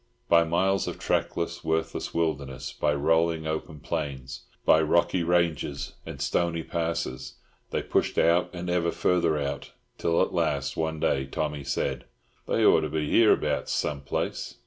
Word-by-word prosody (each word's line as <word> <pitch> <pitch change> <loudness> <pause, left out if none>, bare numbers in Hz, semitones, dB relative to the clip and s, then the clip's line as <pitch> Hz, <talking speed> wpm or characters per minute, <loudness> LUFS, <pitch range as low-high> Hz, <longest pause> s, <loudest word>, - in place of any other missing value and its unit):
By 85 0 +6
miles 95 +4 +1
of - - -4
trackless, 85 0 -1
worthless 80 0 -1
wilderness, 70 -5 -2
by 75 - +1
rolling 80 +2 +2
open 80 -1 -4
plains, 65 -2 -5 0.2
by 80 - +6
rocky 85 +3 +2
ranges 85 -5 0
and - - -7
stony 85 -1 0
passes, 85 0 -3 0.3
they - - -2
pushed - - 0
out 85 +2 +3
and 90 0 -6
ever 90 -1 +1
further 85 -3 +1
out, 70 -1 -4 0.3
till 85 0 +1
at - - -3
last, 70 -1 0
one 80 -1 -2
day, 65 -2 +1
Tommy 70 +1 -3
said, 70 +1 -2 0.4
"They - - +2
ought - - +6
to 75 - -2
be 75 0 -2
hereabouts, 75 -10 +3
some 70 -2 -1
place." 70 - -3
80 Hz, 150 wpm, -27 LUFS, 70-85 Hz, 0.4 s, By